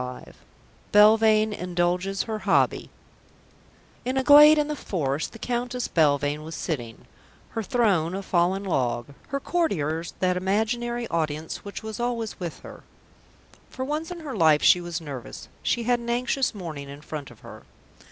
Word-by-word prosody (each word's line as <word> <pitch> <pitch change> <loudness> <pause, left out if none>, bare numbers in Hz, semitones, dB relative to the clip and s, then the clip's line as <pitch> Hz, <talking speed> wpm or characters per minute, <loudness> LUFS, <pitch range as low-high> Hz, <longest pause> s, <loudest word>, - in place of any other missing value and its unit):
CHAPTER 125 0 -7
V - - -24 0.6
BELVANE 215 +1 +5
INDULGES 180 +1 -1
HER 220 -2 -4
HOBBY 195 0 +1 1.1
In 255 +2 -2
a 265 - +2
glade 295 +2 +8
in 300 -1 +1
the 300 - -3
forest 155 - -2
the 225 - -11
Countess 245 +1 -3
Belvane 145 -2 +1
was 160 +1 -7
sitting: 120 -9 -5 0.4
her 225 - -3
throne, 190 -7 +1
a 195 - -4
fallen 185 +2 +1
log, 125 -8 -1 0.2
her 275 - -2
courtiers, 170 - -1
that 180 -1 +1
imaginary 235 +5 -1
audience 155 -1 -2
which 200 +1 -7
was 220 -1 -6
always 235 -2 -3
with 175 -3 -6
her. - - -11 0.9
For 260 - -5
once 305 +3 -3
in 350 -2 -7
her 285 -6 -6
life 160 -5 +4
she 180 - +6
was 175 -1 -5
nervous; 140 -6 -8
she 240 - 0
had 245 +1 +2
an 235 0 -7
anxious 250 +1 0
morning 155 -7 -7
in 140 +1 -10
front 150 -2 -7
of - - -17
her. - - -11
195 Hz, 160 wpm, -25 LUFS, 160-240 Hz, 1.1 s, glade